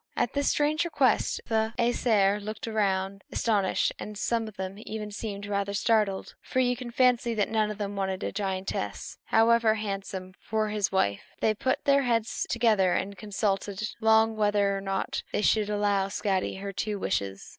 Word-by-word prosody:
At - - 0
this 285 0 +1
strange 300 +2 +2
request 275 -9 +1
the 220 0 0
Æsir 215 -4 +2
looked 215 +2 -5 0.7
astonished, 205 -5 +1
and 210 0 -7
some 230 +1 0
of 215 -1 -11
them 190 +1 -5 0.3
seemed 205 -1 -5
rather 200 0 -2
startled; 210 -3 +1
for 260 - -2
you 250 -1 +2
can 245 0 -7
fancy 240 -1 +2
that 210 -1 0
none 215 -1 +2
of 210 - -5
them 205 -1 -4
wanted 190 -1 -2
a - - -2
giantess, 190 - -3
however 225 0 +4
handsome, 195 -3 -5
for 215 0 -1
his 210 -2 0
wife. 100 - +1 0.2
They 220 - +2
put 260 +5 -1
their 280 0 +5
heads 230 -3 0
together 215 -6 +3
and 200 +1 -2
consulted 205 0 -2
long 220 0 +4
whether 205 -2 +2
or 195 - -3
not 195 0 -2
they 210 - -1
should 210 -1 +3
allow 205 -2 +1
Skadi 195 -1 -1
her 200 0 -5
two 210 +2 -2
wishes. 100 - -2
210 Hz, 165 wpm, -28 LUFS, 195-225 Hz, 0.7 s, their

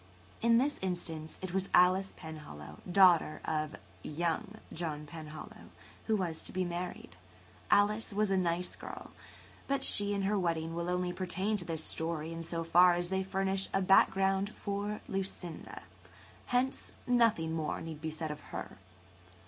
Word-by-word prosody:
In 230 0 +5
this 280 +4 +1
instance 165 -4 -3
it 185 -1 -4
was 190 0 -1
Alice 185 +2 +5
Penhallow, 80 - -9
daughter 175 -5 +5
of 155 -1 -1 0.3
"young" 165 - -2 0.2
John 155 -3 -3
Penhallow, 155 0 -9 0.4
who 220 - +3
was 175 -5 -2
to - - -2
be 185 0 0
[Page 175 - -3
136] 175 - -2
married. 180 0 -7 0.5
Alice 210 +2 +3
was 205 0 +1
a - - +4
nice 180 -1 0
girl, - - -9 0.6
but 275 0 0
she 205 0 +5
and 200 - -1
her 200 +1 +1
wedding 165 -2 -1
only 180 +1 -1
pertain 190 +3 -1
to 175 - -5
this 160 -2 -2
story 160 0 -2
in 165 - -5
so 165 0 -3
far 175 +2 +6
as 175 0 -2
they 190 0 0
furnish 190 0 0
a 195 - +3
background 195 +1 +4
for 205 +1 -3
Lucinda; 190 -3 -4 0.6
hence 250 +2 0
nothing 230 -10 +3
more 155 -2 -2
need 160 -2 -7
be 160 - -2
said 155 0 -4
of 150 - -6
her. - - -6
180 Hz, 160 wpm, -32 LUFS, 160-195 Hz, 0.6 s, far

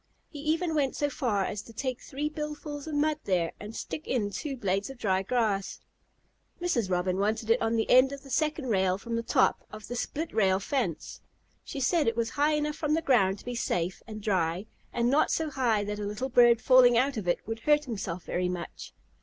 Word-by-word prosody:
He 295 - -9
even 320 +3 0
went 280 -4 +1
so 290 0 0
far 210 -9 0
as 205 - -4
to 230 - -14
take 255 +2 -3
three 290 +3 -3
billfuls 300 -1 -6
of 310 - -3
mud 305 +1 +1
there, 175 -4 +1
and 210 +2 -8
stick 310 - -6
in 210 -6 0
two 275 +4 -4
blades 195 -1 -1
of 270 - -9
dry 190 -5 +1
grass. 205 -2 -1 0.8
Mrs. 250 - 0
Robin 180 +1 0
wanted 220 +2 0
it 235 - +3
on 225 0 +1
the 225 - +1
end 255 +2 +6
of 280 0 -8
the 275 - -12
second 305 -3 0
rail 190 -3 +2
from 230 +4 -5
the 230 - 0
top - - +2
of 215 -1 -9
the 245 - -5
split 315 +6 -3
rail 190 -3 +3
fence. 200 - -3 0.4
She 280 - -6
said 305 +3 +2
it 230 0 +1
was 230 -1 0
high 295 +2 +2
enough 300 0 -1
from 305 -1 +1
the 325 - -1
ground 200 -9 +3
to - - -15
be 245 - -4
safe 180 -6 -2
and 215 -2 -8
dry, 185 -2 0 0.3
and 235 0 0
not 295 +3 +3
so 320 -2 -1
high 235 -6 +1
that 210 0 -4
a - - -3
little 210 +6 -3
bird 240 -2 +5
falling 250 -2 +6
out 265 +3 +2
of 210 -5 -4
it 175 - +3
would 225 +1 -4
hurt 295 +4 +3
himself 195 -7 -4
very 180 0 -1
much. 180 -1 -7
235 Hz, 220 wpm, -28 LUFS, 200-290 Hz, 0.8 s, end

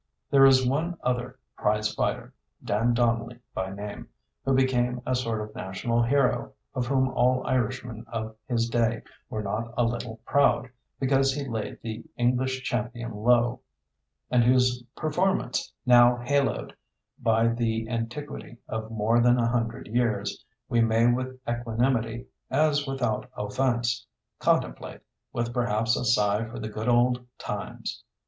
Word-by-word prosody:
There 135 -1 +8
is 130 -1 +5
one 160 +6 0
other 125 +1 -1 0.2
prize 105 0 +1
fighter, - - -2 0.3
Dan 115 +4 +2
Donnelly 115 0 +1 0.2
by 95 0 -3
name, 100 +1 -7 0.4
who 135 0 +2
became 125 -2 +2
a 130 - 0
sort 115 -3 -1
of 105 0 -7
national 110 +6 -1
hero, 130 +2 +1 0.2
of 125 -2 -2
whom 130 0 +2
all 125 0 +2
Irishmen 120 -2 -1
of 110 -1 -5
his 115 -3 +1
day 115 -1 +1 0.3
were 110 - -3
not 110 +3 -3
a 120 - +4
little 115 -1 -3
proud, 140 -2 +3 0.3
because 135 0 +3
he 140 -1 -3
laid 110 -3 -4
the 115 0 -5
English 130 +2 +1
champion 120 -2 -3
low, 120 +3 +3 0.7
and 125 -1 +5
whose 125 0 +3
performance, 175 -3 0
now 120 -1 +7
haloed 130 - 0 0.5
by 115 0 +3
the 115 -1 -1
antiquity 120 +2 -5
of 110 0 -4
more 115 +1 +2
than 120 +1 +5
a 115 -1 +2
hundred 115 -1 -1
years, 120 -1 -1 0.2
we 120 - +2
may 115 0 +3
with 130 +2 0
equanimity, 120 0 0 0.2
as 145 +1 +2
without 125 -4 -1
offense, 120 +1 0 0.3
contemplate, - - 0 0.3
with 120 0 -2
perhaps 115 -2 +1
a - - -2
sigh 105 -2 +3
for 115 +2 -7
the 110 -2 -4
good 110 +2 -3
old 125 +1 +3
times. - - -5
120 Hz, 140 wpm, -27 LUFS, 115-130 Hz, 0.7 s, There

